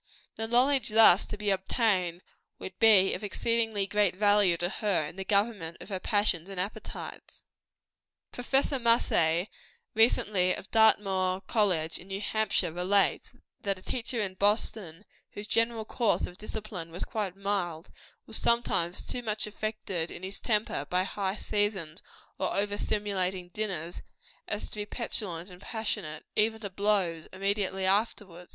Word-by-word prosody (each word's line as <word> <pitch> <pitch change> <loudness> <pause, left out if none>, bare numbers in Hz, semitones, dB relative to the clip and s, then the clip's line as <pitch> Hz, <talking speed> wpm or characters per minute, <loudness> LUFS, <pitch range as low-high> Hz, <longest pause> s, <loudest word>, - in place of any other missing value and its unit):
The 225 - -3
knowledge 255 +3 +3
thus 215 -3 +7
to 210 - -6
be 205 -1 0
obtained, 190 -3 0 0.3
would 190 - -9
be 205 -4 +6
of - - -5
exceeding 230 +3 0 0.2
great 205 -4 +2
value 205 -3 +4
to 175 - 0
her 195 -4 0
in - - -8
the 190 - -5
government 200 -4 0
of - - -10
her 190 -2 -3
passions 200 -4 +1
and 195 -2 -5
appetites. 195 +3 -6 0.9
Prof. 270 +2 +1
Mussey, 180 -7 +3 0.5
recently 205 -5 +3
of - - -10
Dartmouth 195 -4 +3
College, 180 -7 +1
in 180 - -12
New 195 0 -4
Hampshire, 205 -5 0
relates, 190 +3 +1 0.3
that 195 -1 -1
a 185 - -15
teacher 245 0 -3
in 200 -3 -1
Boston, 200 -2 0 0.3
whose 205 - -5
general 230 0 0
course 230 0 +1
of 180 - -11
discipline 210 -5 -6
was 170 +3 -4
quite 200 -4 -3
mild, 190 -5 -3 0.3
was 220 - -1
sometimes 210 -7 +1
so 250 - -4
much 215 -2 -2
affected 210 -5 -4
in 180 - -9
his 190 +1 -4
temper 215 -2 0
by 180 +1 +1
high 195 0 -2
seasoned 205 -7 -2 0.4
or 190 - -1
over 205 0 0
stimulating 190 -4 -1
dinners, 175 -4 -3 0.5
as 210 - -3
to - - -9
be 205 - -2
petulant 185 -7 -3
and 180 +1 -13
passionate, 205 -10 -4
even 220 +1 +2
to 200 -3 -6
blows, 190 -5 +1
immediately 195 0 -1
afterward. 190 -3 -1
200 Hz, 150 wpm, -29 LUFS, 180-215 Hz, 0.9 s, thus